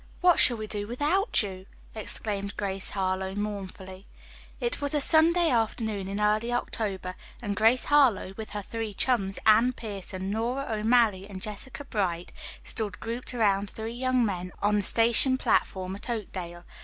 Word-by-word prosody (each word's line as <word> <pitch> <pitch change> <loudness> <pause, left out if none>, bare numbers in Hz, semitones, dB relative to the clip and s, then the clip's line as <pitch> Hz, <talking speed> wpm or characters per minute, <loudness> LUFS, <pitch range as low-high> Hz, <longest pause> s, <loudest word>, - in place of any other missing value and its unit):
What 355 -2 +5
shall 240 - +5
we 215 - -4
do 205 -1 -4
without 295 - +1
you?" 190 -1 -7 0.3
exclaimed 205 -2 -1
Grace 195 -1 -2
Harlowe 190 0 -2
mournfully. 195 -2 -6 0.5
It 475 -8 -1
was 285 +1 +1
a - - +3
sunny 330 +3 +5
afternoon 220 -4 -1
in 200 +1 -3
early 215 +3 +1
October, 200 -6 -3 0.3
and 205 -4 -3
Grace 225 +5 +3
Harlowe 255 -10 +3
with 220 0 -7
her 205 -1 -5
three 225 -1 -5
chums, 195 -5 0
Anne 225 +4 +5
Pierson, 195 -4 -5
Nora 240 +6 -1
O'Malley 215 -3 +2
and 190 -2 -7
Jessica 215 +8 -7
Bright, 180 -8 -2 0.3
stood 205 -5 -2
grouped 235 +2 -5
around 200 -3 +2
three 220 +3 -6
young 255 0 +1
men 180 -3 -3
on 210 +1 +2
the - - +2
station 235 +5 +3
platform 190 -6 0
at 200 - -10
Oakdale. 180 -6 -5
215 Hz, 155 wpm, -27 LUFS, 195-240 Hz, 0.5 s, What